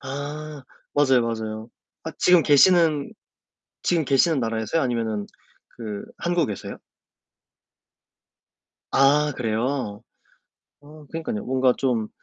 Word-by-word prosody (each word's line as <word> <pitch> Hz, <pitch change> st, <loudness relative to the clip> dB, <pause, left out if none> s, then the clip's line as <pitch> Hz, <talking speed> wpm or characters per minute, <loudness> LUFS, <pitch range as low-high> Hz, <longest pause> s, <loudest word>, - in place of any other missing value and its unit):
아 145 Hz, +2 st, -6 dB, 0.3 s
맞아요, 135 Hz, -4 st, +4 dB
맞아요. 110 Hz, -1 st, -4 dB, 0.4 s
아 160 Hz, -, -5 dB
지금 180 Hz, -3 st, +5 dB
계시는 155 Hz, -1 st, +4 dB, 0.7 s
지금 165 Hz, -4 st, +1 dB
계시는 140 Hz, +3 st, +3 dB
나라에서요? 115 Hz, +6 st, -1 dB
아니면은 115 Hz, -5 st, -2 dB, 0.5 s
그 105 Hz, -3 st, -6 dB
한국에서요? 170 Hz, -, -2 dB, 2.1 s
아 145 Hz, +2 st, +3 dB
그래요? 115 Hz, -1 st, -2 dB, 0.8 s
아 150 Hz, +1 st, -15 dB
그니깐요. 160 Hz, -10 st, -4 dB
뭔가 130 Hz, 0 st, +2 dB
좀 120 Hz, -5 st, -1 dB
135 Hz, 220 characters per minute, -23 LUFS, 115-150 Hz, 2.1 s, 지금